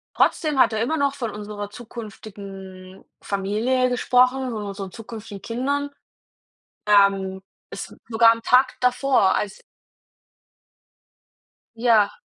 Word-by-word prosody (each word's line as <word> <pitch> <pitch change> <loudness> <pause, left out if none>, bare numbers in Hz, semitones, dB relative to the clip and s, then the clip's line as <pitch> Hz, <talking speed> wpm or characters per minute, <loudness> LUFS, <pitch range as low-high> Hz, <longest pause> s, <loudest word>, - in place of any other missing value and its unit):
trotzdem 300 -5 +2
hat - - +5
er 220 - -1
immer 280 +8 0
noch 280 -1 +1
von 230 -5 -4
unserer 205 -1 -6
zukünftigen 195 -5 -10 0.2
Familie 220 +6 0
gesprochen, 250 +1 +2
von 215 -2 -4
unseren 195 -2 -6
zukünftigen 220 -3 -9
Kindern. 280 +5 -2 1.0
Ähm, 195 -2 +3 0.3
es - - -7 0.2
sogar 225 0 +6
am 230 0 -5
Tag 255 +2 +3
davor, 250 -5 +3
als 200 -2 -2 2.2
Ja. 225 -3 +3
220 Hz, 110 wpm, -23 LUFS, 200-250 Hz, 2.2 s, sogar